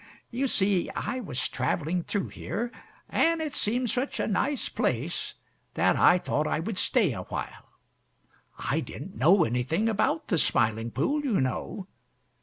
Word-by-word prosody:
You 260 +3 0
see, 195 -6 +2
I 255 - -2
was 160 - -2
traveling 155 +7 -1
through 195 +3 -2
here, 235 +3 -4 0.4
and 330 0 +2
it 310 -3 -3
seemed 240 +1 +1
such 255 +3 -2
a - - +1
nice 270 +7 0
place, - - -2 0.4
that - - +3
I 180 - +6
thought 155 -3 -1
I - - 0
would 185 +4 -1
stay 210 - +2
a 90 - -5
while. - - -6 0.9
I - - -1
didn't - - -7
know 170 - +5
anything 130 - 0
about 295 +9 0
the 175 -7 +3
Smiling 110 -2 +2
Pool, 280 - 0
you 245 -8 +1
know. 135 +8 -2
195 Hz, 155 wpm, -27 LUFS, 150-250 Hz, 0.9 s, I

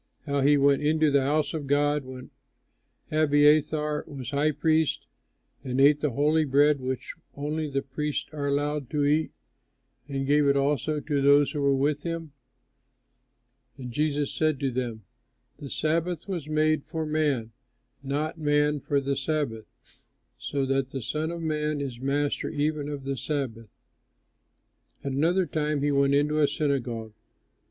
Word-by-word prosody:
how 140 -2 0
he 145 +2 +5
went 140 0 +3
into 155 0 +2
the 140 0 +4
house 145 +1 0
of 150 -3 -4
God, 145 +1 +2
when 130 0 -10 0.8
Abiathar 150 0 +3
was 130 -3 -7
high 145 +2 +2
priest, 155 +1 +1 0.6
and 130 0 -2
ate 145 +2 +6
the 150 - 0
holy 150 +4 +2
bread 145 +1 +3
which 130 0 -4 0.2
only 150 +2 -3
the 135 0 -2
priests 150 +2 -3
are 145 -2 -3
allowed 145 -1 -1
to 145 -2 0
eat, 155 +2 +2 0.8
and 135 -1 -2
gave 145 +1 +3
it 140 0 +3
also 145 +2 0
to 145 -2 -1
those 140 +1 +5
who 150 - -3
were 140 -1 +3
with 145 +2 0
him?" 165 -2 -5 1.5
And 125 -2 -7
Jesus 145 +1 0
said 155 -3 0
to 135 -2 0
them, 120 -3 -4 0.6
"The 140 - -8
Sabbath 165 +4 -1
was 175 -7 -4
made 155 -1 +1
for 160 0 -4
man, 150 -7 0 0.5
and 135 - -9
not 155 +3 -2
man 150 0 +2
for 140 +1 0
the 140 0 -1
Sabbath; 135 -5 -2 0.7
so 140 -1 -2
that 135 0 0
the 135 -3 -5
Son 155 +6 -2
of 170 0 -5
Man 150 -1 -1
is 130 -4 -5
master 140 +2 -1
even 150 -1 -1
of 145 -2 -5
the 135 0 -2
Sabbath." 125 -8 -4 1.3
At 140 - -3
another 170 +7 +2
time 150 -3 -1
he 145 - +2
went 140 0 +3
into 150 +2 +2
a 145 - +5
synagogue. 125 -7 -2
145 Hz, 160 wpm, -27 LUFS, 140-155 Hz, 1.5 s, ate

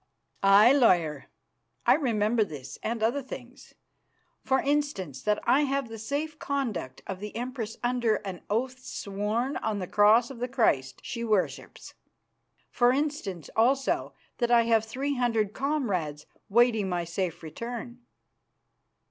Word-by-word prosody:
"Aye, 200 +5 +7
lawyer, 175 - +3 0.6
I - - +7
remember 225 -5 +2
this 145 -9 -8
and 225 0 -2
other 240 +6 +1
things. 250 -1 -11 0.7
For 265 0 +2
instance, 280 - -1
that 210 0 +1
I 280 - +4
have 275 -3 -1
the 225 -1 -8
safe 295 +7 -3
conduct 240 - -3
of 195 -2 -5
the 210 +1 -7
Empress 235 -2 -4
under 240 -3 +2
an 185 -3 -6
oath 255 +5 -1
sworn 210 +7 -2
on 220 -2 -2
the 190 - -3
Cross 215 +6 +4
of 250 - -10
the 250 - -1
Christ 140 - +1
she 235 -2 -5
worships. 215 -5 -2 0.8
For 245 0 +4
instance, 265 - -2
also, 265 +4 +2 0.3
that 240 -2 +1
I 240 -1 +5
have 225 -1 +2
three 270 +5 -3
hundred 225 -4 +1
comrades 200 - -2 0.2
waiting 225 -2 +3
my 175 -1 -1
safe 170 0 -3
return." 235 +8 -6
230 Hz, 140 wpm, -28 LUFS, 200-255 Hz, 0.8 s, Aye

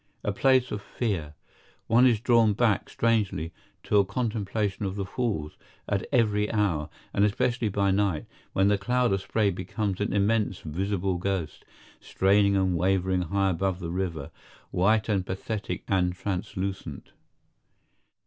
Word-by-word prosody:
A 105 - 0
place 130 +4 +3
of 105 - -3
fear. 95 -10 -3 0.5
One 120 +3 +5
is 115 -4 +3
drawn 115 -2 +4
back, 110 -2 +1
strangely, 100 -8 0 0.3
to 105 - +3
a - - +5
contemplation 105 -1 -2
of 95 -1 -2
the 100 -1 -3
Falls, 95 -8 -3 0.3
at 100 -1 -1
every 105 -5 +2
hour, 90 -8 0 0.2
and 100 - +2
especially 115 +2 +1
by 100 0 +1
night, 95 -5 0 0.3
when 95 +1 +3
the 100 -1 +2
cloud 125 +2 +1
of 95 - 0
spray 100 +1 +1
becomes 95 +2 -3
an 105 - 0
immense 100 0 +1
visible 95 +3 -2
ghost, 90 -4 -3 0.3
straining 100 +1 +2
and 95 -2 +2
wavering 95 +1 +1
high 95 +2 +1
above 95 +1 -1
the 85 -2 -5
river, 85 -6 -3 0.4
white 105 +4 +2
and 100 -4 +1
pathetic 100 +2 -4
and 90 -2 +1
translucent. 95 -4 -4
100 Hz, 145 wpm, -27 LUFS, 95-105 Hz, 0.5 s, One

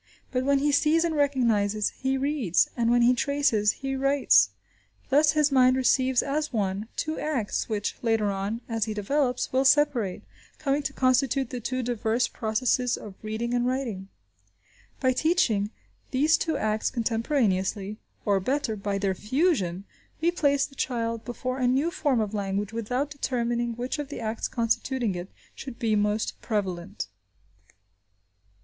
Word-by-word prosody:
But 255 0 -1
when 280 0 +4
he 290 +2 +2
sees 305 +3 +3
and 335 -1 0
recognises, 230 -8 +1
he 265 0 -2
reads; 265 - +1
and 235 -1 +1
when 240 0 +4
he 245 +1 +5
traces, 250 -6 +2
he 270 0 -4
writes. 275 +1 +4 0.6
Thus 295 +2 +4
his 300 -2 +3
mind 255 -1 +5
receives 260 0 +2
as 300 +2 -2
one, 205 -2 -1
two 315 0 -2
acts, 260 -10 -2
which, 210 -2 -2
later 225 -3 +1
on, 200 +4 -3
as 225 -2 -1
he 215 -1 -4
develops, 250 +6 0
will 260 +1 +3
separate, 275 -8 +2 0.3
coming 280 0 0
to 275 - -4
constitute 260 0 +1
the 250 - -4
two 255 +2 -2
diverse 240 0 0
processes 240 +2 0
of 210 - -9
reading 225 +3 -3
and 245 0 +1
writing. 240 -7 -3 0.9
By 260 -1 +2
teaching 250 - +2 0.4
these 300 +5 +3
two 320 0 -1
acts 215 0 0
contemporaneously, 220 -4 0 0.3
or, 200 -2 +3
better, 255 +2 -1
by 200 -1 -2
their 195 -1 0
fusion, 210 - 0 0.4
we 335 +2 +2
place 285 -5 +2
the - - -13
child 230 -4 -2
before 255 +2 -4
a 250 - +2
new 275 +7 +2
form 285 -9 +1
of 215 -1 -3
language 200 +1 -2
without 245 +6 -2
determining 240 -4 -1
which 250 +5 -3
of 290 -2 -4
the 290 - -6
acts 220 0 -2
constituting 235 -1 0
it 175 +1 -6 0.2
should 260 -4 -8
be 220 -2 +1
most 210 +1 -1
prevalent. 185 - -3
245 Hz, 155 wpm, -26 LUFS, 215-275 Hz, 0.9 s, he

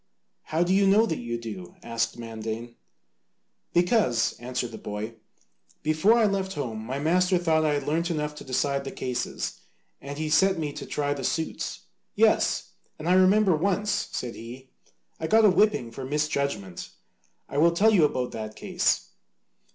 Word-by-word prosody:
"How 160 +2 +1
do 180 +2 +1
you 195 0 +4
know 210 +4 +5
that 165 -7 -2
you 120 0 -3
do?" 105 -6 -8
asked 115 0 -2
Mandane. 115 0 -6 1.0
"Because," 175 - +2
answered 125 0 -3
the 110 - -8
boy, 105 +2 -5 0.7
"before 155 +9 +4
I 230 - +4
left 195 -2 -1
home 115 -9 -4
my 130 +4 -4
master 180 +5 +2
thought 160 -2 +2
I 150 -1 +2
had 145 - -2
learnt 165 +3 0
enough 150 -2 -2
to - - -8
decide 140 +2 0
the 135 - -5
cases, 125 -1 -3 0.4
and 140 +1 -7
he 155 0 -2
set 185 +5 +4
me 150 -3 -3
to - - -7
try 145 -1 -1
the 140 -2 -6
suits. 160 +5 -2 0.3
Yes! - - +2 0.3
and 155 - -6
I 180 - +4
remember 185 0 +5
once, 200 +5 0 0.2
said 120 -2 -4
he, 125 +3 -10 0.5
"I 160 - -2
got 220 +3 +5
a 205 - +7
whipping 195 - +2
for 130 +3 -7
misjudgment. 140 - -2 0.6
I 140 - -2
will 165 +2 +6
tell 210 +6 +4
you 180 -6 +5
about 130 -4 0
that 110 -1 -6
case. - - 0
150 Hz, 170 wpm, -26 LUFS, 120-180 Hz, 1.0 s, a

